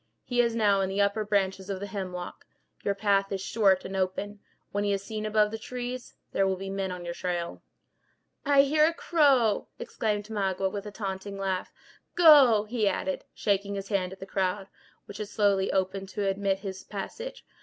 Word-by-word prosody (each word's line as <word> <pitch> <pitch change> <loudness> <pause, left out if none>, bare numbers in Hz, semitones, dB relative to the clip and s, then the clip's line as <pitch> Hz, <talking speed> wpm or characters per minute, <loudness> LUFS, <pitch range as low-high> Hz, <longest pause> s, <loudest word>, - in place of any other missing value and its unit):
He 245 -1 +2
is 235 -1 0
now 205 -3 +3
in 190 - 0
the 195 +1 -2
upper 200 +2 +2
branches 195 -2 0
of 195 -1 -3
the 200 - -4
hemlock. 185 -3 -6 0.4
Your 200 - 0
path 195 -1 +2
is 195 - -1
short 195 -1 +2
and 190 - -5
open. 190 +2 -2 0.3
When 205 0 -1
he 205 -1 +1
is 195 0 -2
seen 215 0 -4
above 210 -1 +3
the 225 - -5
trees, 250 +1 -6 0.2
there 195 - +2
will 190 - +1
be 195 +1 -6
men 195 -1 -2
on 180 -1 -6
your 170 - -3
trail." 175 -1 -3 0.8
"I 280 -1 +5
hear 305 +2 +4
a 330 - -1
crow!" 275 - +3
exclaimed 210 -2 -2
Magua, 195 -3 -1
with 205 +1 -5
a - - -6
taunting 200 -1 -5
laugh. 190 -2 -2 0.4
"Go!" 285 -11 +7
he 215 -1 0
added, 190 -1 -1
shaking 200 0 0
his 195 0 -5
hand 190 -3 0
at 190 - -10
the - - -7
crowd, 190 0 -1 0.4
which 205 - -9
had 210 -1 -4
slowly 200 -2 +2
opened 190 0 -1
to 200 +1 -2
admit 195 0 0
his 190 -1 -6
passage. 470 - -7
200 Hz, 195 wpm, -28 LUFS, 190-215 Hz, 0.8 s, Go